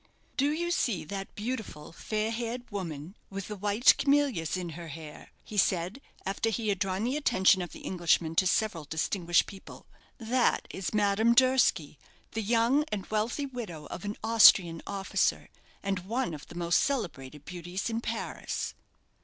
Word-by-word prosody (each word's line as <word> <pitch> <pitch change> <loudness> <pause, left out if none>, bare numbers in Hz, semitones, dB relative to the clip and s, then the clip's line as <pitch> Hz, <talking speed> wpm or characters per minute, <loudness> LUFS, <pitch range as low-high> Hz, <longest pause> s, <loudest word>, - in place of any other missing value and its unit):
"Do 280 +1 +2
you 345 +3 -1
see 215 - 0
that 195 +4 -6
beautiful, 215 -10 -5
fair 215 +5 -2
haired 235 +1 -4
woman, 170 -3 -5
with 195 -1 -6
the 210 - -4
white 205 +4 +4
camellias 275 - +2
in 180 -2 -4
her 165 +1 -8
hair?" 155 0 -10
he 210 - -8
said, 185 +5 +1 0.2
after 195 +4 0
he 225 -1 -1
had 195 -3 0
drawn 190 +1 -1
the 250 +4 0
attention 195 -10 +4
of 175 - -5
the - - -11
Englishman 170 -2 +1
to 185 - +4
several 180 -5 0
distinguished 170 +3 +1
people. 195 -1 -12 0.3
"That 240 +1 +1
is 190 - -4
Madame 210 +2 +3
Durski, 245 - +3 0.3
the 225 - -2
young 235 +6 +3
and 200 -3 -3
wealthy 225 +7 0
widow 220 - -7
of - - -6
an 205 +1 -3
Austrian 195 -7 +6
officer, 195 -1 0 0.3
and 195 -1 -1
one 225 +2 -2
of 150 - -9
the 170 - -12
most 170 0 +2
celebrated 150 - -3
beauties 180 +1 -5
in 230 0 -2
Paris." - - -4
200 Hz, 160 wpm, -29 LUFS, 175-230 Hz, 0.3 s, Austrian